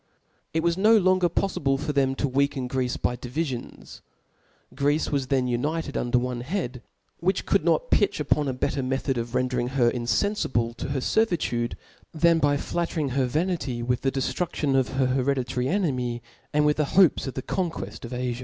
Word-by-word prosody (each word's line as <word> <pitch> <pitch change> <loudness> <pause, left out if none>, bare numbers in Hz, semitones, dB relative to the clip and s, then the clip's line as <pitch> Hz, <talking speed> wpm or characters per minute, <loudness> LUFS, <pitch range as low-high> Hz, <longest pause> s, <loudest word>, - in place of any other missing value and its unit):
It 160 0 0
was 170 +1 +1
no 220 +3 +6
longer 185 -2 +3
polfible 140 -7 0
for 150 +1 -2
them 135 -1 +2
to 140 - 0
>frcaken 135 -1 0
'Greece 125 -1 -1
by 125 - -1
divifions: 130 +1 -5 0.7
Greece 145 +3 +1
was 140 -3 0
then 130 -2 +1
united 145 +5 -2
under 120 0 +1
one 125 0 -2
head, 130 -4 -3 0.4
who 185 - +4
could - - 0
not - - +1
pitch - - +3
upon 150 -1 +1
a 130 - -1
better 130 +2 -1
me 130 +1 0
thod 135 -1 -2
of 115 +1 -5
rendering 125 -1 0
her 125 -2 +2
infenfible 120 - 0
of - - -3
her 135 -2 -1
fervitude, 150 - 0 0.4
than 165 +1 +4
by 145 -1 +3
flattering 165 -1 -2
her 130 0 +1
vanity 145 -5 -1
with 125 +1 0
the 135 - +1
deftrudtion 140 +1 -1
of 130 -1 +3
her 135 0 +2
hereditary 130 -1 0
enemy, 130 - -1 0.3
and 150 0 +2
with 150 0 +2
the 150 - +2
hopes 185 -7 +5
of 130 - -5
the 130 - -4
conqueft 175 -4 -3
of 120 - -6
Afia. 125 -1 -3
135 Hz, 180 wpm, -25 LUFS, 125-160 Hz, 0.7 s, no